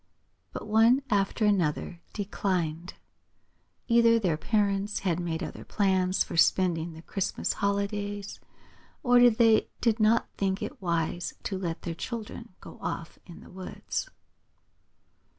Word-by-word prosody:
But - - -6
one 225 +5 +4
after 205 +2 +1
another 175 -3 0
declined. 180 -5 -2 0.9
Either 230 -1 +5
their 185 -8 +1
parents 200 +2 0
had 180 -3 0
made 170 -1 -3
other - - -7
plans 190 -2 +1
for - - -7
spending 170 -1 +2
the 160 +1 -12
Christmas 195 +1 -2
holidays, 200 0 -2 0.6
or 245 -2 +7
they 225 -1 +3
did 230 -2 +1
not 220 +2 +3
think 195 0 -1
it - - -7
wise 170 -1 -1
to 195 - -3
let 175 -3 -4
their 170 - -3
children 225 +2 -7
go - - -12
off 165 - -5
in 170 - -11
the - - -14
woods. 190 - -5
195 Hz, 130 wpm, -28 LUFS, 175-215 Hz, 0.9 s, or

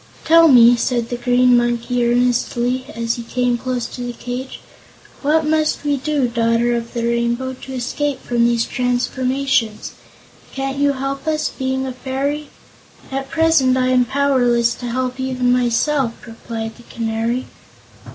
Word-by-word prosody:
"Tell 330 +1 +7
me," 245 -4 +7
said 240 -1 -1
the 245 - -2
Green 245 +1 +3
Monkey 240 0 0
earnestly, 245 +1 0
as 230 +1 -1
he - - -5
came 245 +1 0
close 250 0 -3
to 250 - -8
the 245 0 -4
cage, 250 +2 -6 0.6
"what 310 +2 +2
must 310 -1 +1
we 290 -1 +1
do, 285 -1 0
Daughter 235 0 +1
of 235 +1 -5
the 235 -1 -1
Rainbow, 235 +2 -1
to 265 - -8
escape 265 +2 -2
from 240 -1 +1
these 235 -1 +2
transformations? 250 -1 -1 0.6
Can't 270 0 -3
you 285 0 +3
help 275 +2 -4
us, 310 -1 0
being 265 0 -2
a 260 - -4
Fairy?" 275 +4 -3 0.6
"At 270 0 -4
present 320 -6 +3
I 255 0 +1
am 250 -1 +3
powerless 245 -3 +2
to 245 - -7
help 255 +1 -2
even 255 -1 0
myself," 250 +1 +1
replied 225 -1 -7
the 240 - -15
Canary. 230 +2 -2
250 Hz, 150 wpm, -19 LUFS, 240-270 Hz, 0.6 s, Tell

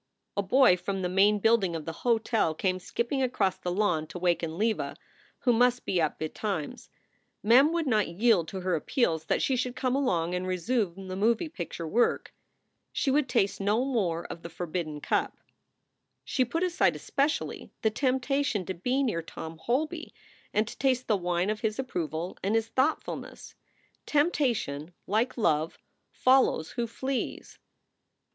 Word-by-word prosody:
A 200 - +1
boy 200 -1 +5
from 195 +1 -3
the 180 - 0
main 200 +3 +4
building 205 -5 +2
of 160 -2 -5
the 165 - -3
hotel 225 -7 +1
came 185 +2 0
skipping 235 +8 -2
across 215 -7 +1
the 180 - -3
lawn 175 -5 +1
to - - -8
waken 170 -2 0
Leva, 220 +2 0 0.5
who 245 - +3
must 245 +1 +3
be 180 - +1
up 155 - 0
betimes. 160 +1 -4 0.5
Mem 255 +8 +6
would 335 -1 0
not 215 -6 +2
yield 185 -1 +2
to 190 +2 -5
her 185 0 0
appeals 160 - 0
that - - +1
she 265 - +2
should 250 0 -2
come 255 0 0
along 180 -11 +1
and 180 +1 -2
resume 190 0 -1
the 185 - -4
moving 230 - +1
picture 170 - -5
work. 235 +9 +1 0.6
She 270 - 0
would 280 -1 +2
taste 200 -6 +1
no 210 +6 +2
more 185 -11 -1
of 165 - -7
the 170 - -7
forbidden 165 -3 -4
cup. - - 0 0.9
She 260 - +1
put 330 +8 -1
aside 365 0 +2
especially 290 +2 -2
the 220 - +3
temptation 265 -3 0
to 190 - -3
be 250 +10 0
near 215 -10 0
Tom 160 0 -8
Holby 310 - -2 0.4
and 215 +1 +1
to - - -7
taste 255 -2 +2
the 215 - +3
wine 180 +1 0
of 215 - -4
his 215 -1 -1
approval 170 - -3
and 200 +3 0
his 225 0 +1
thought 260 +6 +1
fulness. - - -8 0.5
Temptation, 240 - 0
like 225 +7 0
love, 160 -7 +1 0.3
follows 255 -11 +3
who 240 -1 -2
flees. 260 +3 -4
210 Hz, 165 wpm, -28 LUFS, 175-255 Hz, 0.9 s, Mem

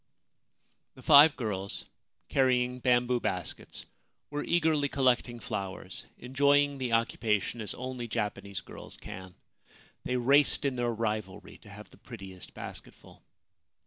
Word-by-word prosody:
The 130 - -14
five 150 +1 +8
girls, 100 -6 -4 0.4
carrying 125 -1 +2
bamboo 125 0 +2
baskets, 90 -7 -5 0.5
were 145 0 -2
eagerly 155 -4 +2
collecting 125 -3 +1
flowers, 95 -3 -6
enjoying 140 +2 +2
the 125 -2 -2
occupation 115 -1 0
as 105 - -2
only 130 -2 -5
Japanese 100 -2 -3
girls - - -12
can. 95 -1 -9 0.7
They 125 - -1
raced 140 +4 +4
in 135 -2 0
their 120 -1 0
rivalry 105 -3 -4
to 105 - -16
have 105 +1 -12
the - - -17
prettiest 95 -6 -10
basketful. - - -10
120 Hz, 120 wpm, -30 LUFS, 105-135 Hz, 0.7 s, five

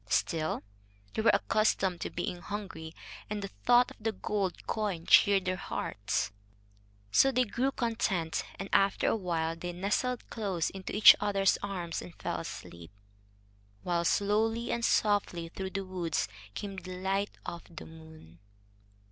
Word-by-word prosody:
Still, 155 +5 0 0.5
they - - 0
were 225 - +5
accustomed 195 -5 +1
to - - -2
being 180 -4 -4
hungry, 190 -6 -6 0.3
and 210 -1 -3
the 195 - -4 0.2
thought 245 0 +5
of - - -13
the 225 +1 -1
gold 195 -2 -2
coin 200 -7 -2
cheered 200 -2 +6
their 185 0 0
hearts. 100 - -2 0.8
So 270 - +5
they 255 0 +3
grew 250 +4 0
content, 220 -10 -1
and 195 - -5
after 195 0 +3
a - - +2
while 165 -5 -1
they 175 +1 -5
nestled 210 +7 -1
close 195 -7 -1
into 190 0 -6
each 210 - +10
other's 200 -2 +2
arms 180 -4 -3
and 175 - -10
fell - - -3
asleep, 85 -1 -8 0.9
while 175 -1 0
slowly 220 +6 +1
and 235 - -1
softly 200 -7 +1
through 190 +2 -5
the 195 0 -4
woods 180 - -1 0.3
came 195 -2 -5
the 185 0 -7
light 195 +2 -1
of 170 - -5
the 165 - -9
moon. 160 - -14
195 Hz, 150 wpm, -31 LUFS, 170-210 Hz, 0.9 s, each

